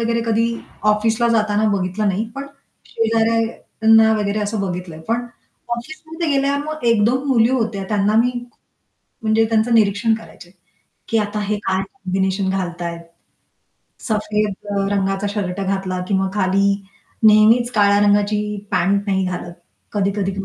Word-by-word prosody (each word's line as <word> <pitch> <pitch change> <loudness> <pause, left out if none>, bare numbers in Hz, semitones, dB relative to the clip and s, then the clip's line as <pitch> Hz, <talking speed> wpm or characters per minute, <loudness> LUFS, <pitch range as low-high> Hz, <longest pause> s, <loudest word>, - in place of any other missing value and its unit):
वगैरे 230 0 0
कधी 225 +1 +2 0.4
ऑफिसला 225 +2 +1
जाताना 215 -1 +2
बघितलं 190 +3 -1
नाही. 200 +3 0
पण 275 0 -6 0.4
शेजाऱ्यांना 225 0 +2
वगैरे 205 0 -1
असं 210 +1 -2
बघितलंय. 180 -4 -5
पण 240 +2 -1 0.5
ऑफिसमध्ये 315 +5 -6
गेल्यावर 280 +1 +1
मग 310 -4 -6
1-2 235 +4 +2
मुली 235 -2 +4
होत्या. 225 -6 -1
त्यांना 210 0 +1
मी, 240 +2 +4 0.9
म्हणजे 220 0 +3
त्यांचं 225 +1 +2
निरीक्षण 220 +1 +3
करायचंय. 180 -5 -11 0.6
की 225 - +1
आता 210 0 -2
हे 210 +1 -1
काय 190 0 +1
कॉम्बिनेशन 190 -3 -1
घालतायेत? 175 -3 -3 1.1
सफेद 210 -2 0 0.2
अ, 195 -1 0
रंगाचा 195 0 0
शर्ट 200 -2 -3
घातला 190 -1 -2
किंवा 190 -1 +1
खाली 195 0 +2 0.5
नेहमीच 220 +3 +5
काळ्या 205 -2 +4
रंगाची 205 +1 +2 0.3
पँट 195 +3 +2
नाही 190 -1 +1
घालत. 175 -1 -5 0.4
कधी-कधी 200 -1 0
210 Hz, 130 wpm, -19 LUFS, 195-225 Hz, 1.1 s, नेहमीच